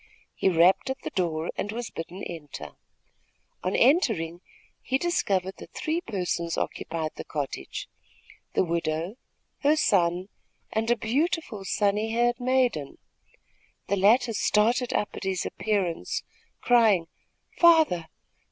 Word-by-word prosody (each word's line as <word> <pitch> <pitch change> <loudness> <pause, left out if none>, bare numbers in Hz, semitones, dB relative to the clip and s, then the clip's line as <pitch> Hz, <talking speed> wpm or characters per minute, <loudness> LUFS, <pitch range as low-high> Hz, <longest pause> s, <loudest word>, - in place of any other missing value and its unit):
He - - +2
rapped 175 +6 +4
at 265 - -3
the - - -4
door 165 -3 -1
and 205 - -3
was 235 +1 -5
bidden 175 +3 -7
enter. 145 - -7 0.9
On 185 - 0
entering, 220 - +3 0.4
he 265 - 0
discovered 195 - 0
that - - -13
three 320 +2 -1
persons 180 - -2
occupied 160 -1 -3
the - - -5
cottage 145 -3 -5 0.7
the - - +3
widow, 170 +3 -2 0.4
her 295 +2 +4
son 180 - +2 0.4
and 225 +1 0
a 240 - +5
beautiful, 250 - -1
sunny 210 +2 +1
haired 240 +1 +2
maiden. 245 - +1 0.9
The 200 - +3
latter 225 +5 +4
started 230 +4 +2
up 210 - 0
at - - -7
his 190 -2 -1
appearance, 195 -6 -1 0.4
crying: 220 -8 +4 0.5
"Father! 315 - +5
200 Hz, 125 wpm, -27 LUFS, 170-240 Hz, 0.9 s, a